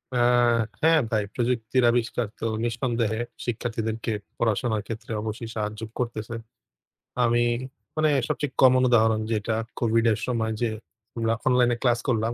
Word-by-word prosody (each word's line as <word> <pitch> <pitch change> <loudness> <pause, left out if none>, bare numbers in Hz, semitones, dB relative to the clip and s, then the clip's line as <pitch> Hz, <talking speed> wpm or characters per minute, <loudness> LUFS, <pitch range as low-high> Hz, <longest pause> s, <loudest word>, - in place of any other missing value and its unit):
আ - - +2 0.6
হ্যাঁ 160 0 +5
ভাই, 110 -2 +2
প্রযুক্তির 125 0 +1
আবিষ্কার 120 -1 0
তো - - -3 0.2
নিঃসন্দেহে 115 -2 -1 0.2
শিক্ষার্থীদেরকে 115 -1 -2 0.3
পড়াশোনার 110 -1 0
ক্ষেত্রে 115 0 -6
অবশ্যই 110 +1 -5
সাহায্য 105 0 -3 0.2
করতেছে। 115 -2 -3 0.9
আমি, 120 0 +3 0.5
মানে 155 0 +3 0.2
সবচেয়ে 145 -3 -2
কমন 130 -1 +6
উদাহরণ 110 -2 +4
যেটা 110 0 0 0.2
Covid-এর 115 -2 +2
সময় 110 -3 0
যে, 120 - +2 0.5
আমরা 115 0 +1
অনলাইন 125 -1 +4
এ - - -9
ক্লাস 120 -2 +3
করলাম। 115 -2 +1
115 Hz, 130 wpm, -25 LUFS, 110-120 Hz, 0.9 s, কমন